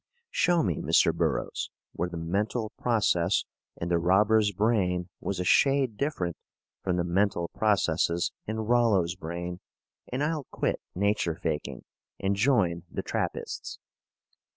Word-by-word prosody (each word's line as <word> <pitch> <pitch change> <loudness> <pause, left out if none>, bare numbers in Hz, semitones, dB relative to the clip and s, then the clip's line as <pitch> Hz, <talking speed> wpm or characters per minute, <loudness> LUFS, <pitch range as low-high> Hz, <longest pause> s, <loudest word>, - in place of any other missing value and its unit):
Show 175 -1 +3
me, 90 -7 -1
Mr. - - +4
Burroughs, - - -1 0.2
where 90 - -2
the 85 - -6
mental 105 +7 -1
process 100 -6 +2 0.3
in 85 - -3
the 85 -1 +2
robber's 105 +4 +4
brain 95 -4 +1
was 95 -2 -3
a - - 0
shade 135 +3 +3
different 100 - -2 0.5
from 90 -2 0
the 90 - +1
mental 90 -1 +1
processes 85 -5 +1 0.2
in 110 +1 -2
Rollo's 110 -7 +3
brain, 85 0 -5 0.5
and 130 +3 -1
I'll 150 -2 -1
quit - - -1
nature 100 -3 +1
faking 80 -2 -3 0.4
and 100 +1 +1
join 100 -7 +2
the - - -4
Trappists. - - -3
95 Hz, 130 wpm, -28 LUFS, 85-110 Hz, 0.5 s, Mr